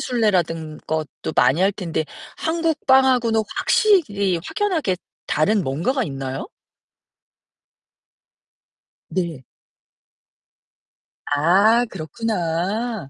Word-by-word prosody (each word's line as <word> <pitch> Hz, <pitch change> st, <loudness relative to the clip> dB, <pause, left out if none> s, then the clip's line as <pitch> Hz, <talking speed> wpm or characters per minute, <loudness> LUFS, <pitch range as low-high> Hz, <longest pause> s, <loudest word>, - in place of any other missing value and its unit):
순례라든 175 Hz, -10 st, 0 dB
것도 155 Hz, 0 st, -3 dB
많이 130 Hz, +7 st, +4 dB
할 195 Hz, +1 st, +4 dB
텐데 165 Hz, -5 st, -3 dB, 0.3 s
한국 325 Hz, -1 st, -1 dB
빵 265 Hz, 0 st, +6 dB
하고는 235 Hz, -4 st, +2 dB, 0.2 s
확실히 205 Hz, -, +2 dB
확연하게 335 Hz, -, -1 dB, 0.3 s
다른 195 Hz, +7 st, +2 dB
뭔가가 175 Hz, -, -1 dB
있나요? 135 Hz, -3 st, -5 dB, 2.6 s
네. 170 Hz, -8 st, -3 dB, 1.9 s
아, 200 Hz, +11 st, +4 dB
그렇구나. 190 Hz, -, -3 dB
195 Hz, 175 characters per minute, -21 LUFS, 160-240 Hz, 2.6 s, 빵